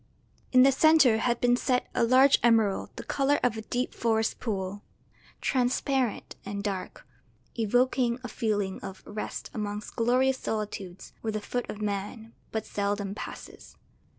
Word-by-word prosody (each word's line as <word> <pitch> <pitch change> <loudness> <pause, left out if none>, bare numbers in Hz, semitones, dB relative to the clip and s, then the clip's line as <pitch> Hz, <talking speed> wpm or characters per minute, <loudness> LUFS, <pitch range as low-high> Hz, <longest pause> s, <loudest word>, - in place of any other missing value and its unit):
In 255 0 +7
the 275 - +6
centre 275 -5 +5
had 240 +1 +1
been 245 0 +4
set 250 0 0
a - - +2
large 260 +4 +6
emerald 225 -4 +3
the - - -7
colour 280 +1 +1
of 245 -3 +2
a 220 - -4
deep 245 +3 -2
forest 225 -1 0
pool, 200 -3 -3 0.6
transparent 255 -2 0
and 200 0 -5
dark, 195 -3 -4 0.5
evoking 245 +2 +2
a - - -4
feeling 210 -4 -1
of 190 0 -8
rest 210 0 -6
amongst 210 -1 -5
glorious 255 +3 +2
solitudes 200 -4 -5
where 220 -1 -2
the 215 - -1
foot 245 +3 -4
of 215 0 -5
man 210 +3 -4 0.2
but 220 -1 -3
seldom 200 -1 -2
passes. - - -9
225 Hz, 150 wpm, -28 LUFS, 205-250 Hz, 0.6 s, In